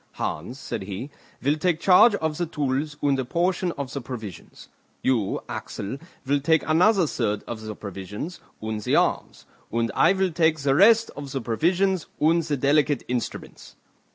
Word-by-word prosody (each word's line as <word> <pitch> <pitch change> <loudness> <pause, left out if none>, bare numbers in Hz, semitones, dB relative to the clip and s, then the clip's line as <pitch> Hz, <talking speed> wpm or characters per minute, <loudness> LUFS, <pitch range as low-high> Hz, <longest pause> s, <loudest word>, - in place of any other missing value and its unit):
"Hans," 115 - -4
said 140 - -5
he, 100 +8 -6 0.3
"will 145 +3 +2
take 165 0 +1
charge 200 +4 +6
of 160 -4 -2
the 175 - 0
tools 145 0 -2
and 140 -2 +2
a - - 0
portion 175 +6 0
of 140 -2 -6
the 140 - -3
provisions; 115 -6 -9 0.4
you, 115 -7 +1
Axel, 105 +8 -5 0.3
will 140 +2 +2
take 160 +1 +2
another 180 +4 +4
third 105 -8 -1
of 115 -2 -6
the 110 -1 -6
provisions, 100 - -7 0.2
and 110 -1 -3
the - - +1
arms; - - 0 0.3
and 115 0 0
I - - +4
will 190 -1 0
take 160 -1 +2
the 140 -2 +1
rest 225 +8 +5
of 140 -2 -7
the 135 - -2
provisions 175 - +1
and 165 +3 +4
the 150 -3 -2
delicate 145 +2 +2
instruments." 125 -1 -5
145 Hz, 170 wpm, -25 LUFS, 120-170 Hz, 0.4 s, charge